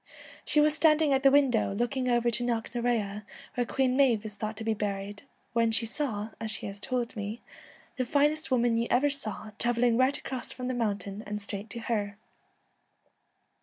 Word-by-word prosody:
She 300 - +3
was 300 0 +5
standing 305 -1 +4
at 265 - +2
the 275 - +7
window, 265 -8 +3
looking 250 +3 0
over 240 0 +2
to 235 +2 -1
Knocknarea 230 -3 -1 0.3
where 245 - 0
Queen 260 -2 +1
Maive 245 -6 +3
is 215 - -5
thought 215 +1 -5
to 225 - -5
be 225 0 +1
buried, 200 -1 -4 0.3
when 230 -1 +3
she 225 +1 +2
saw, 225 -4 -3
as 220 - -3
she 220 - -1
has 200 0 -6
told 240 +2 -2
me, 210 +2 -4 0.3
' - - -26
the 255 - +1
finest 295 +4 +1
woman 240 -3 +2
you 235 +1 0
ever 280 +4 +3
saw 220 -5 -6
travelling 240 -1 +2
right 260 +3 +3
across 255 -3 -4
from 250 -1 -5
the 255 - -1
mountain 205 -3 -2
and 210 0 -3
straight 200 +1 -6
to 235 - -6
her.' 205 -3 -2
235 Hz, 190 wpm, -29 LUFS, 215-255 Hz, 0.3 s, the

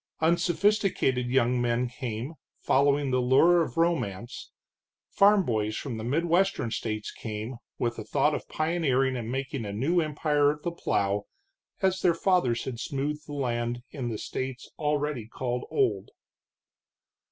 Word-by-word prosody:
Unsophisticated 175 - +2
young 125 -1 +2
men 120 +1 +1
came, 120 +2 -5 0.2
following 140 0 +2
the 130 0 +2
lure 165 +8 +5
of 165 - -3
romance; 120 - -1 0.6
farm 200 0 +5
boys 110 -2 -1
from 125 -6 -4
the 110 - -5
midwestern 165 0 +1
states 110 -2 -3
came, 110 +2 -6 0.2
with 120 -1 -2
a - - -4
thought 145 +6 +1
of - - -4
pioneering 145 -5 +1
and 120 -2 -4
making 135 -1 -3
a 100 - -4
new 145 - +1
empire 150 -1 +2
of 150 0 -3
the 175 - -1
plow, 100 -10 -1 0.6
as 190 0 +2
their 170 -2 +3
fathers 165 -10 +2
had 120 -3 -5
smoothed 145 +4 -3
the 145 - -7
land 120 -3 -2
in 130 -5 -4
the 110 - -3
states 130 +3 -5
already 150 -5 -1
called 125 +1 -3
old. 405 -2 0
135 Hz, 145 wpm, -28 LUFS, 120-160 Hz, 0.6 s, lure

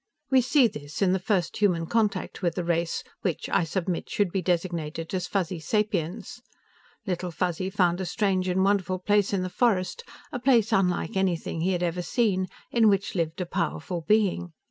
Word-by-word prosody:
We 260 -1 +6
see 255 0 +4
this 145 -2 -5
in 185 -1 +3
the 190 - +1
first 185 -3 0
human 180 -5 +2
contact 210 -1 -1
with 170 -3 0
the 180 - -2
race 170 0 -1 0.2
which, 180 -5 -2
I 190 - +2
submit, 175 +1 -2
should 200 -4 0
be 190 - 0
designated 170 -2 -2
as 180 -2 -1
Fuzzy 185 -3 -1
sapiens. 210 +4 -2 0.6
Little 180 -2 -2
Fuzzy 180 +2 -2
found 180 -2 +1
a - - -2
strange 190 -1 0
and 185 +1 +2
wonderful 190 -2 +1
place 205 +2 +2
in 195 -2 0
the - - -2
forest, 230 - +1 0.3
a 250 - -3
place 240 -4 +3
unlike 180 -3 +1
anything 180 -4 -1
he 185 +3 +1
had 175 0 -1
ever 175 +1 -1
seen, 190 -2 +1 0.2
in 225 -2 +5
which 195 -1 +1
lived 165 -1 -2
a - - -1
powerful 170 -1 -2
being. 185 -3 +1
185 Hz, 185 wpm, -26 LUFS, 170-205 Hz, 0.6 s, We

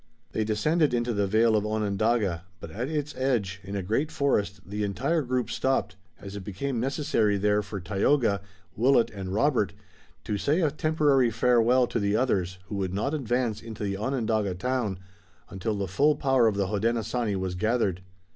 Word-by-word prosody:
They 110 - 0
descended 140 +8 +1
into 120 0 0
the 100 -1 +1
vale 110 +2 +3
of 105 - +2
Onondaga, 105 -3 0
but 80 - -9
at 120 - -3
its 150 -1 -3
edge, 110 -8 -1
in 100 +2 -6
a 100 - -2
great 115 - 0
forest, 105 -9 0
the 105 +2 -3
entire 130 - 0
group 125 -3 -1
stopped, 130 -7 0 0.2
as 100 0 -9
it 100 - -6
became 115 +6 -3
necessary 125 -5 +1
there 105 +1 +2
for 100 -1 -6
Tayoga, 100 +3 +1 0.3
Willet 120 0 +3
and 95 -3 -6
Robert 110 -3 +1 0.5
to 100 +4 -2
say 155 - +1
a 155 -4 +2
temporary 150 -5 +2
farewell 120 +2 +3
to 115 - -2
the 100 0 +1
others 95 -7 0
who 100 0 -5
would 95 -1 -2
not 135 +9 -1
advance 120 -5 -1
into 110 -1 -7
the 100 -1 -1
Onondaga 110 -4 -1
town 115 -1 -1 0.5
until 100 +3 -2
the 100 -1 -2
full 145 - +3
power 135 -4 +3
of 110 - +1
the 100 -1 +1
Hodenosaunee 110 +2 -1
was 95 -1 -2
gathered. 100 -2 0
110 Hz, 175 wpm, -27 LUFS, 100-130 Hz, 0.5 s, vale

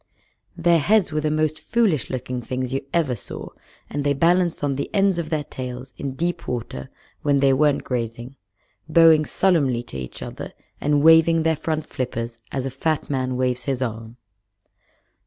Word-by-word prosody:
Their 170 -1 +4
heads 200 +3 +3
were 155 0 0
the 155 - 0
most 155 0 0
foolish 210 - +1
looking 125 -1 -4
things 130 +1 -3
you 135 - -1
ever 155 -7 +1
saw, 105 - -7 0.4
and 145 0 -3
they 140 0 +1
balanced 170 +2 +2
on 140 -2 +1
the 140 - -3
ends 195 -3 +3
of 160 -2 -3
their 155 -2 -1
tails 125 -1 -7
in 135 -2 -5
deep 175 +4 -2
water 110 - -4 0.3
when 145 -1 +2
they 135 -1 +4
weren't 145 +1 +2
grazing, 120 +1 -4 0.5
bowing 160 -1 +6
solemnly 140 -12 +2
to 70 - -9
each 65 - -7
other - - -7 0.3
and 145 0 +2
waving 165 0 +6
their 160 0 +2
front 155 0 -2
flippers 115 -2 -4
as 135 -1 -2
a 135 - -3
fat 150 +3 -1
man 130 -2 -1
waves 125 -1 -1
his 135 -2 -1
arm. 115 0 -6
140 Hz, 175 wpm, -23 LUFS, 125-160 Hz, 0.5 s, bowing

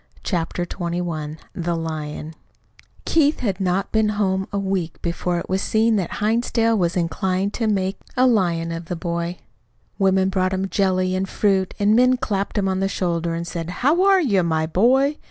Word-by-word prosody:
CHAPTER 175 -1 -2
XXI 170 -4 -4 0.2
THE 175 -2 -2
LION 155 -1 -5 0.7
Keith 305 -2 +2
had 200 -6 -1
not 185 +1 0
been 220 -1 +2
home 190 -2 0
a 200 - -2
week 190 -4 -2
before 175 +1 -1
it 170 - -4
was 190 +1 0
seen 220 +1 +2
that 185 -4 -2
Hinsdale 230 +1 +1
was 180 -3 0
inclined 185 +3 -1
to 225 - -1
make 195 -2 0 0.2
a 255 - +5
lion 175 -8 +2
of 165 0 -5
the 175 - -4
boy. 170 +1 -3 0.6
Women 190 -1 +3
brought 185 -1 0
him 190 +1 -2
jelly 185 -2 +1
and 190 +1 -2
fruit, 195 -3 +1
and 205 +1 +3
men 255 +1 +4
clapped 210 -6 -2
him 195 -1 +1
on 190 0 0
the 195 0 0
shoulder 170 -3 -1
and 170 0 -3
said, 170 -1 -5
"How 290 - +2
are 390 -1 +5
you, 205 - +2
my 160 -2 0
boy?" 260 - +2
190 Hz, 180 wpm, -22 LUFS, 170-210 Hz, 0.7 s, a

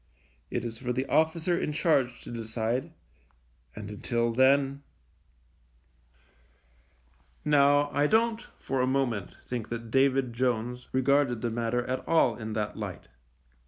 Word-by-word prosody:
It 120 -1 -3
is 115 -1 -5
for 125 -2 -3
the 130 +2 -1
officer 160 +4 +2
in 150 - -2
charge 135 -7 +1
to - - -9
decide, 115 +2 -2 0.8
and 100 - -7
until 115 +2 -1
then 135 +2 +3 2.6
Now, 145 0 +4
I 145 +1 +2
don't 225 +2 +2 0.2
for 135 -1 -2
a 130 - +2
moment 130 -7 -1
think 120 -3 -4
that 115 -1 -6
David 135 -2 +2
Jones 125 0 -1
regarded 130 -2 +2
the 120 -1 -1
matter 120 +1 -1
at 130 0 -3
all 145 -8 +3
in 110 -1 -6
that 105 -1 -2
light. - - -7
125 Hz, 130 wpm, -28 LUFS, 115-140 Hz, 2.6 s, Now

